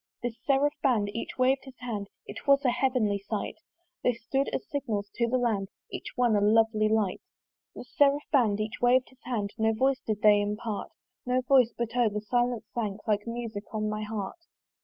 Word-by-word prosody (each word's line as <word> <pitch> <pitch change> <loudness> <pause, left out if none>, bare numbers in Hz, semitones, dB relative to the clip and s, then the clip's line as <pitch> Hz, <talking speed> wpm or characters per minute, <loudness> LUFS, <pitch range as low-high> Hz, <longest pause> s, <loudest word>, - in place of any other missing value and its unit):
This 240 -2 -2
seraph 285 +1 +3
band, 220 -7 +2
each 230 - -5
wav'd 265 +1 +3
his 265 -2 -13
hand: 220 -5 -4 0.2
It - - -9
was 280 0 +5
a 250 - +5
heavenly 245 -6 +1
sight: 200 +1 -4 0.4
They 245 - +2
stood 270 +5 -1
as - - -4
signals 220 -8 -3
to 235 - +1
the 255 +2 +1
land, 215 -6 0 0.2
Each - - -6
one 245 -3 +3
a 205 - +3
lovely 215 0 +3
light: 215 -4 +1 0.5
This 250 - -11
seraph 285 0 +4
band, 220 -7 +3
each 215 +1 -4
wav'd 245 +1 +4
his 260 0 -24
hand, 215 -5 -2
No 220 0 +3
voice 265 +4 +2
did 215 -2 -4
they 210 -1 +6
impart 210 +1 -3 0.4
No 250 +1 +2
voice; 255 -2 +4
but 235 0 -3
O! 240 -3 +4
the 210 0 -3
silence 240 +1 0
sank, 215 -3 -3
Like 210 0 +1
music 230 -3 -5
on 215 0 0
my 215 0 -3
heart. 210 - -4
230 Hz, 195 wpm, -28 LUFS, 210-255 Hz, 0.5 s, they